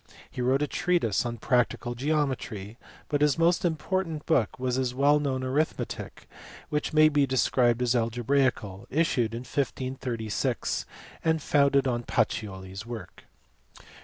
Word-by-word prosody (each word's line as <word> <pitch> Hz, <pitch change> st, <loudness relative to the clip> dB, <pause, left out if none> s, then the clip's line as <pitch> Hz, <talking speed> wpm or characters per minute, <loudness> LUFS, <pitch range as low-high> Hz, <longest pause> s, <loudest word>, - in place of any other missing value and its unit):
He 125 Hz, -, -5 dB
wrote 130 Hz, +3 st, +2 dB
a -, -, 0 dB
treatise 135 Hz, -, +1 dB
on 120 Hz, 0 st, -4 dB
practical 120 Hz, +1 st, 0 dB
geometry, 125 Hz, -6 st, -2 dB, 0.3 s
but 145 Hz, -1 st, -1 dB
his 150 Hz, -2 st, +3 dB
most 170 Hz, +1 st, +3 dB
important 165 Hz, -1 st, -1 dB
book 135 Hz, -10 st, +1 dB
was 125 Hz, -1 st, -1 dB
his 125 Hz, -1 st, -1 dB
well 145 Hz, +2 st, +4 dB
known 135 Hz, -3 st, -1 dB
arithmetic 140 Hz, +5 st, -3 dB, 0.4 s
(which 150 Hz, 0 st, -1 dB
may 155 Hz, 0 st, +6 dB
be 145 Hz, -2 st, +2 dB
described 125 Hz, -2 st, +2 dB
as 125 Hz, 0 st, +2 dB
algebraical) 120 Hz, -4 st, 0 dB
issued 125 Hz, -7 st, +1 dB
in 120 Hz, -, -4 dB
1536 130 Hz, -5 st, -2 dB, 0.4 s
and 160 Hz, -1 st, +2 dB
founded 140 Hz, -2 st, +3 dB
on 120 Hz, -2 st, 0 dB
Pacioli 95 Hz, -5 st, -2 dB
s 95 Hz, +3 st, -7 dB
work. 115 Hz, -1 st, -9 dB
130 Hz, 135 wpm, -27 LUFS, 120-150 Hz, 0.4 s, may